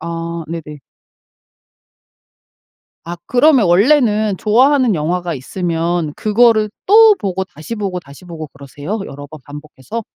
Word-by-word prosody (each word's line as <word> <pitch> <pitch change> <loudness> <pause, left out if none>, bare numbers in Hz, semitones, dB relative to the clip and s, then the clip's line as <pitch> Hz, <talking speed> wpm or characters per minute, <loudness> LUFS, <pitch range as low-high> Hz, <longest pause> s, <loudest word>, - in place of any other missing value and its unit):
아. 170 0 -5
네네. 155 -3 -7 2.3
아 175 +1 -5
그러면 255 -3 +3
원래는 215 - +2
좋아하는 255 +2 +3
영화가 175 +2 -2
있으면 165 +2 -3
그거를 215 0 +2 0.2
또 435 +2 +7
보고 190 - -3
다시 170 +5 -9
보고, 195 -4 -4
다시 140 +2 -16
보고 165 -3 -8
그러세요? 145 +9 -7
여러 145 +1 -10
번 155 +1 -12
반복해서? 150 - -8
180 Hz, 265 characters per minute, -16 LUFS, 160-220 Hz, 2.3 s, 또